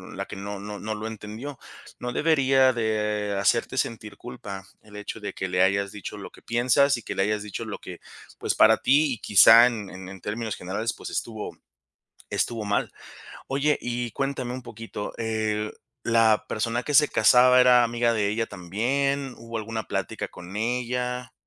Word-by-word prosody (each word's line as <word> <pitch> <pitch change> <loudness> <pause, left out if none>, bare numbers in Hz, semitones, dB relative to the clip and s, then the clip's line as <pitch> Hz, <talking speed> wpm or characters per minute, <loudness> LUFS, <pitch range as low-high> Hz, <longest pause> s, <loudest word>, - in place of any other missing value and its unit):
la - - -4
que - - -9
no 100 +1 -6
no 105 0 -7
no 110 0 -4
lo 105 +1 -5
entendió, 110 +5 -7 0.4
no 125 - -4
debería 135 -4 +4
de 105 -3 -1
hacerte 115 +5 +1
sentir 110 -5 -3
culpa 115 -6 -8 0.2
el 105 -1 -16
hecho 105 +2 -6
de 105 - -5
que 95 - -3
le 90 0 +1
hayas 100 +1 +1
dicho 105 - -7
lo - - -8
que - - -17
piensas, 125 +4 +3
y 120 - -9
que - - -5
le 95 - +2
hayas 105 +1 -1
dicho 105 -2 -6
lo - - -6
que, - - -9 0.4
pues, - - -1
para - - +6
ti 145 +2 +3
y 115 - -7
quizá 110 +4 +8
en 110 -5 -4
en 95 0 -9
en 95 -1 -10
términos 110 0 -3
generales, 105 +5 -3
pues, - - -8
estuvo 110 -2 -5 0.7
estuvo 115 -2 -1
mal, 100 0 0 0.6
oye, 140 +2 +1
y 120 -1 -3
cuéntame 135 -1 -3
un 130 - -6
poquito, 115 -3 -7
eh, 110 -1 -1 0.3
¿la 115 -2 +3
persona 115 +2 -1
que 150 - -3
se 150 +2 +6
casaba 125 +3 +6
era 125 -1 +6
amiga 120 0 +1
de 105 -3 +1
ella 115 +2 -1
también?, 130 +10 -1
¿hubo 115 0 -6
alguna 110 0 -4
plática - - -3
con 90 +2 -11
ella? 125 +2 -2
115 Hz, 180 wpm, -25 LUFS, 105-125 Hz, 0.7 s, quizá